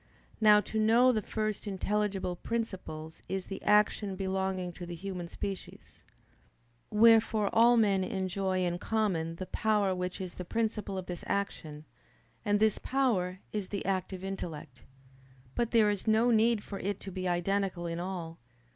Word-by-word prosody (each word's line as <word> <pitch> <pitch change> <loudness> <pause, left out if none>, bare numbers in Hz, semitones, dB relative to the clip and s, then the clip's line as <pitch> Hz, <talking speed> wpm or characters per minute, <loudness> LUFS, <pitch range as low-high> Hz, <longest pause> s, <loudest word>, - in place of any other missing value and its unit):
Now 210 -1 +7
to 220 - -3
know 230 +4 +5
the 220 -3 0
first 215 0 -3
intelligible 195 -1 -1
principles 180 -7 -5
is 190 -1 -2
the 195 - -7
action 210 -1 +3
belonging 190 -1 -2
to 175 +1 -8
the 175 - -5
human 180 -1 -5
species. 195 +2 -7 0.9
Wherefore 220 -1 +5
all 235 +2 +6
men 200 -4 +3
enjoy 190 0 -1
in 175 0 -1
common 180 -8 0
the 185 - -5
power 210 -1 +1
which 180 0 -3
is 185 -2 -5
the 180 - -6
principle 215 0 -2
of 185 - -4
this 180 -1 -6
action: 155 -6 -3 0.6
and 205 -1 +2
this 220 -1 +3
power 205 -9 0
is 205 -3 -3
the 200 - -4
active 190 -1 -2
intellect. 160 -10 -6 0.7
But 235 +6 0
there 220 -3 +4
is 205 +1 -4
no 220 +3 +4
need 225 -1 +3
for 200 - -6
it 200 0 -2
to 195 - -7
be 185 0 -3
identical 180 0 0
in 170 0 -3
all. 175 -2 -5
195 Hz, 155 wpm, -30 LUFS, 180-215 Hz, 0.9 s, Now